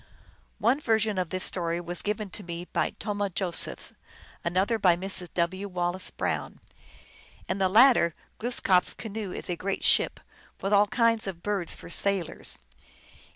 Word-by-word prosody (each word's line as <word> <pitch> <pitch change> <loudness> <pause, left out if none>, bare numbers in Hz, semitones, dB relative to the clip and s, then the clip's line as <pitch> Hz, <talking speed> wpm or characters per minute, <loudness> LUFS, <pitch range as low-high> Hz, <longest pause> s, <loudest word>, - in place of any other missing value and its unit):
One 260 +5 +2
version 220 -5 +1
of 180 -3 -2
this 185 0 -2
story 170 -2 -1
was 175 0 -2
given 210 -1 -3
to - - -6
me 170 -1 -6
by - - -2
Tomah 205 -2 -2
Josephs, 180 -1 -1 0.5
another 190 +6 +1
by 180 -4 +5
Mrs. 185 -1 +1
W. 185 +3 -1
Wallace 180 0 -2
Brown. - - -3 0.9
In 190 - -2
the 190 -1 +3
latter 220 -6 +6 0.2
Glooskap 215 -6 +2
s - - -4
canoe 215 -3 -5
is - - -3
a 175 - -1
great 195 +3 -3
ship, - - +3 0.4
with 195 +2 -1
all 205 0 +5
kinds 230 0 +2
of 170 -3 -6
birds 200 -4 +1
for - - -11
sailors. 195 -3 +1
190 Hz, 155 wpm, -27 LUFS, 175-210 Hz, 0.9 s, latter